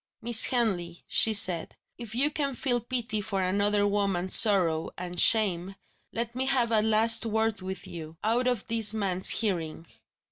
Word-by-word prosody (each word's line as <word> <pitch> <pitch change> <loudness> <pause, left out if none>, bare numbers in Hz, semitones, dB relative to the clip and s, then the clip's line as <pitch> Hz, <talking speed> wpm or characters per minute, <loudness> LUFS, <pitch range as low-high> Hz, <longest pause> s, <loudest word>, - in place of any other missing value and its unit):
"Miss 235 0 +3
Henley," 185 -9 -2
she 225 - +2
said, 185 -5 0 0.2
"if 230 -2 -8
you 285 +5 +1
can 280 -3 -3
feel 245 -1 -1
pity 235 -3 -3
for 195 -2 -3
another 205 +2 +1
woman's 200 -3 -1
sorrow 180 -7 +4
and 180 0 -5
shame, 195 -4 +2 0.4
let 235 0 -4
me 260 +2 -2
have 245 -4 +1
a 220 -1 +3
last 220 +1 +2
word 220 -1 -1
with 190 0 -7
you 165 -3 -9
out 235 +4 +1
of 245 -2 -1
this 220 -2 -1
man's 190 -3 0
hearing." 170 -7 -1
215 Hz, 165 wpm, -27 LUFS, 185-230 Hz, 0.4 s, sorrow